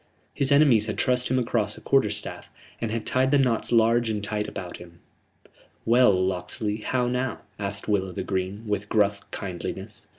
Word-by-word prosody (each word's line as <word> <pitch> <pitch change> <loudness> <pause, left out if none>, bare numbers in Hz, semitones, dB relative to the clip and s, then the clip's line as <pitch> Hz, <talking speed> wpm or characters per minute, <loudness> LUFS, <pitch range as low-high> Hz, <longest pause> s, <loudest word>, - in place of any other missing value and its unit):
His 140 0 0
enemies 135 -7 +5
had 105 - -3
trussed 125 -1 +1
him 130 - +1
across 115 -4 0
a - - -9
quarter 135 -6 +3
staff, 105 0 -6 0.3
and 115 - -1
had 110 0 -3
tied 130 +1 +2
the 145 - +4
knots 125 -5 +1
large 115 0 +4
and 105 -2 -2
tight 105 0 -2
about 90 -2 -7
him. 85 -1 -13 0.9
"Well, 120 0 +5
Locksley, 95 +3 -1
how 125 +3 -1
now?" 125 -1 -2 0.2
asked 100 0 -3
Will 100 -3 +1
o' - - -7
th' - - -5
Green, 95 +3 -3
with 105 -1 -2
gruff 100 -1 +2
kindliness. 90 -4 -6
110 Hz, 185 wpm, -25 LUFS, 100-125 Hz, 0.9 s, enemies